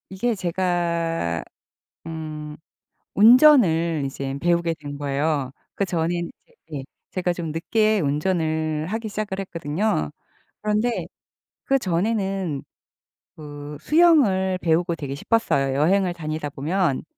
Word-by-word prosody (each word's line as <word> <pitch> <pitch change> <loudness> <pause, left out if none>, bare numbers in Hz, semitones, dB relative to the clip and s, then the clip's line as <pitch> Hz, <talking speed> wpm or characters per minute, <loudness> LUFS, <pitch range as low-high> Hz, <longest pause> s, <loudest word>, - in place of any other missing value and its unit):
이게 225 +5 0
제가 170 - -1 0.7
음 155 -2 -6 0.6
운전을 205 - +6
이제 135 0 -4
배우게 170 -1 +1
된 145 -1 -7
거에요. 140 -1 -1 0.2
그전에는 175 -4 0
인제 155 -2 -11
예. - - -6 0.3
제가 180 -1 0
좀 170 -3 -4
늦게 215 +5 +1
운전을 155 0 0
하기 220 +3 -3
시작을 205 -2 -4
했거든요. 165 - -1 0.5
그런데 215 +3 0 0.6
그전에는 195 - 0 0.7
그 145 -1 -8
수영을 220 - +4
배우고 170 +1 +1
되게 140 -3 -5
싶었어요. 140 -8 +1
여행을 180 +5 +3
다니다 155 -2 -4
보면 155 +1 -1
170 Hz, 240 characters per minute, -23 LUFS, 150-195 Hz, 0.7 s, 운전을